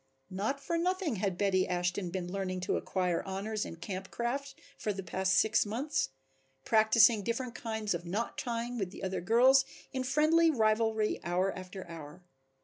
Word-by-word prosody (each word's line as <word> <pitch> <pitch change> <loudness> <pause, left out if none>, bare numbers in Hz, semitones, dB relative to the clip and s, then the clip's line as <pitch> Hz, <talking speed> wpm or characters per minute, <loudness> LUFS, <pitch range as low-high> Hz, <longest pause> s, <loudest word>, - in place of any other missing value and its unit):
Not 215 +9 -1
for 335 +4 -2
nothing 360 - 0
had 190 -2 -1
Betty 190 -2 +2
Ashton 180 +1 -1
been 180 0 -4
learning 185 -1 -3
to - - 0
acquire 180 -3 0
honors 205 +3 -3
in - - -7
camp 190 +3 -6
craft 275 +4 -3 0.2
for 210 - -2
the 195 -1 -5
past 185 +1 0
six 215 +2 +4
months, 235 - -1 0.6
practicing 220 0 +5
different 235 +3 -3
kinds 220 -3 -2
of 170 0 -4
knot 200 +7 -3
tying 240 0 -3
with 195 -3 -2
the 195 - -10
other 190 0 -2
girls 250 +7 +5 0.3
in 260 -1 -1
friendly 310 +5 +4
rivalry 220 -4 +2
hour 180 +3 0
after 185 0 -8
hour. 165 +1 -10
210 Hz, 165 wpm, -31 LUFS, 185-235 Hz, 0.6 s, practicing